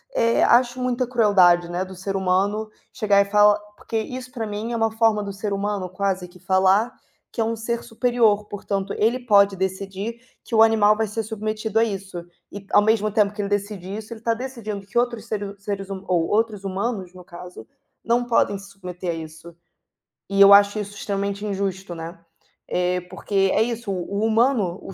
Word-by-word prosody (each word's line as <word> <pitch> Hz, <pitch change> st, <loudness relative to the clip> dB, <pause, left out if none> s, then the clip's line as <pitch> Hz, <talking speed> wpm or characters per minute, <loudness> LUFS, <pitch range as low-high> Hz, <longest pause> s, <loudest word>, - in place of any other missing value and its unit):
eh, 230 Hz, 0 st, +3 dB
acho 245 Hz, +1 st, +3 dB
muita 250 Hz, 0 st, 0 dB
crueldade, 190 Hz, -8 st, +4 dB
né, 175 Hz, +2 st, -2 dB
do 190 Hz, 0 st, -11 dB
ser 195 Hz, +2 st, -4 dB
humano 195 Hz, +3 st, 0 dB, 0.2 s
chegar 200 Hz, -2 st, +3 dB
e -, -, +1 dB
falar 210 Hz, 0 st, +5 dB, 0.2 s
porque 225 Hz, -, -4 dB
isso 250 Hz, +3 st, -5 dB
pra 230 Hz, -5 st, -4 dB
mim 210 Hz, +3 st, -4 dB
é -, -, -2 dB
uma 225 Hz, -1 st, +1 dB
forma 220 Hz, -1 st, +2 dB
do 200 Hz, -1 st, -5 dB
ser 200 Hz, +1 st, -3 dB
humano 200 Hz, -2 st, -2 dB
quase 185 Hz, -1 st, -2 dB
que 180 Hz, +1 st, -18 dB
falar 190 Hz, +5 st, +3 dB, 0.4 s
que 230 Hz, -, -3 dB
é -, -, +3 dB
um 230 Hz, +1 st, -1 dB
ser 235 Hz, +1 st, -3 dB
superior, 230 Hz, -3 st, +1 dB
portanto 200 Hz, -1 st, -3 dB
ele 230 Hz, +4 st, +1 dB
pode 200 Hz, -3 st, +5 dB
decidir 195 Hz, +4 st, -4 dB, 0.2 s
que -, -, -12 dB
o 220 Hz, -, +5 dB
animal 215 Hz, -2 st, +5 dB
vai 220 Hz, 0 st, -1 dB
ser 220 Hz, +2 st, -3 dB
submetido 215 Hz, 0 st, -2 dB
a 225 Hz, -, +5 dB
isso 195 Hz, -5 st, -4 dB, 0.3 s
e, 205 Hz, -, -8 dB
ao 205 Hz, -, +6 dB
mesmo 215 Hz, -1 st, +2 dB
tempo 210 Hz, -1 st, +2 dB
que 210 Hz, -, -4 dB
ele 200 Hz, -, -3 dB
decide 200 Hz, -2 st, -3 dB
isso, 220 Hz, +1 st, -8 dB
ele 220 Hz, -, -12 dB
tá 230 Hz, 0 st, +1 dB
decidindo 225 Hz, -5 st, -6 dB
que 205 Hz, +5 st, -6 dB
outros 240 Hz, -2 st, -2 dB
seres 205 Hz, -2 st, -4 dB
seres 195 Hz, -1 st, -4 dB
huma 195 Hz, -1 st, -6 dB
ou 170 Hz, -3 st, +1 dB
outros 215 Hz, -2 st, 0 dB
humanos, 195 Hz, -1 st, -3 dB
no 180 Hz, -, -11 dB
caso, 175 Hz, -8 st, -11 dB, 0.4 s
não 240 Hz, +2 st, +2 dB
podem 230 Hz, -4 st, +2 dB
se 195 Hz, -, -13 dB
submeter 180 Hz, -2 st, -7 dB
a -, -, -3 dB
isso. 160 Hz, +1 st, -10 dB, 0.7 s
E 195 Hz, 0 st, -1 dB
eu 200 Hz, 0 st, +10 dB
acho 200 Hz, +1 st, +5 dB
isso 205 Hz, 0 st, -6 dB
extremamente 200 Hz, 0 st, -3 dB
injusto, 195 Hz, -2 st, -3 dB
né. 165 Hz, +2 st, -7 dB, 0.5 s
Eh, 180 Hz, 0 st, 0 dB
porque 195 Hz, -2 st, 0 dB
é -, -, +3 dB
isso, 235 Hz, -2 st, -4 dB
o 190 Hz, +2 st, -3 dB
o -, -, +2 dB
humano, 220 Hz, -5 st, +2 dB
o 195 Hz, -, -9 dB
205 Hz, 200 wpm, -23 LUFS, 190-225 Hz, 0.7 s, eu